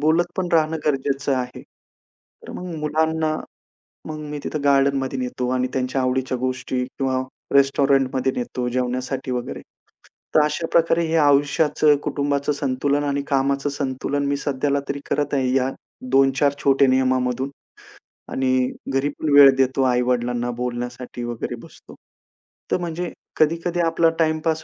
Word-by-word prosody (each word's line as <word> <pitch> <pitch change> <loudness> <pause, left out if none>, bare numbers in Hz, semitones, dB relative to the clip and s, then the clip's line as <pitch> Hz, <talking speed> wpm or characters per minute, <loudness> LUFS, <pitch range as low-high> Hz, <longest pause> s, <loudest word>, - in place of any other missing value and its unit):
बोलत 160 +3 +3
पण 185 -2 -1
राहणं 160 -1 +2
गरजेचं 140 -1 0
आहे. 125 0 -4 0.8
तर - - -9
मग 180 -2 -6
मुलांना 155 +1 0 0.7
मग 155 -1 -6
मी 150 0 -5
तिथं 150 -2 -4
गार्डनमध्ये 135 -1 +2
नेतो 125 0 -3
आणि 125 0 0
त्यांच्या 130 +1 -1
आवडीच्या 130 0 0
गोष्टी 130 0 -2
किंवा 130 0 -2 0.3
रेस्टॉरंटमध्ये 135 -1 +3
नेतो 125 0 -3
जेवण्यासाठी 130 +1 -2
वगैरे. 125 -1 -4 0.7
तर 155 - +7
अशा 150 +2 -1
प्रकारे 165 0 +3
हे 160 0 -1
आयुष्याचं 145 +1 +3
कुटुंबाचं 140 0 -1
संतुलन 140 +1 0
आणि 140 -1 -1
कामाचं 140 +1 +1
संतुलन 140 0 -2
मी 140 0 0
सध्याला 140 0 0
तरी 140 0 -2
करत 145 0 0
आहे. 130 -2 +1
या 130 0 +2 0.4
2-4 135 +1 +4
छोटे 135 0 +4
नियमामधून 130 0 +1 0.8
आणि 130 -1 +1 0.2
घरी 135 +2 +1
पण 155 - -1
वेळ 140 -1 +10
देतो 135 0 +2
आई-वडिलांना 125 -1 +1
बोलण्यासाठी 120 0 -5
वगैरे 120 -1 -4
बसतो. - - -15 0.8
तर - - +3
म्हणजे 175 0 -4 0.3
कधी-कधी 165 +3 +1
आपला 165 0 +3
टाईमपास 160 0 +1
140 Hz, 135 wpm, -22 LUFS, 130-150 Hz, 0.8 s, वेळ